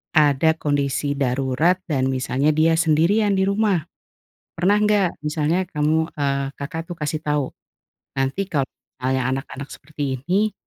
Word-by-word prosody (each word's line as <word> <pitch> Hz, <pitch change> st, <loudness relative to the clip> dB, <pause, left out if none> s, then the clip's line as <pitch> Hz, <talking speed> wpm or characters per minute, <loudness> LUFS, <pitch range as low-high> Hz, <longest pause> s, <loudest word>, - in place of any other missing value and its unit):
ada 150 Hz, 0 st, +5 dB
kondisi 145 Hz, -1 st, 0 dB
darurat 135 Hz, +6 st, +1 dB
dan 135 Hz, -4 st, +1 dB
misalnya 130 Hz, +2 st, 0 dB
dia 160 Hz, +1 st, +4 dB
sendirian 170 Hz, +6 st, +3 dB
di 190 Hz, -, +3 dB
rumah, 200 Hz, -4 st, +1 dB, 0.7 s
pernah 185 Hz, +5 st, +3 dB
gak? 205 Hz, -4 st, +2 dB
Misalnya 155 Hz, +4 st, 0 dB
kamu, 160 Hz, 0 st, 0 dB
eee, 140 Hz, -1 st, 0 dB
Kakak 160 Hz, +3 st, -5 dB
tuh 175 Hz, -, -4 dB
kasih 155 Hz, 0 st, -2 dB
tahu, 150 Hz, -2 st, 0 dB, 0.7 s
nanti 135 Hz, +9 st, 0 dB
kalau 140 Hz, -7 st, 0 dB, 0.3 s
misalnya 130 Hz, 0 st, 0 dB
anak-anak 135 Hz, +1 st, -6 dB
seperti 140 Hz, -3 st, -4 dB
ini, 195 Hz, +8 st, +1 dB
150 Hz, 135 wpm, -22 LUFS, 140-175 Hz, 0.7 s, ada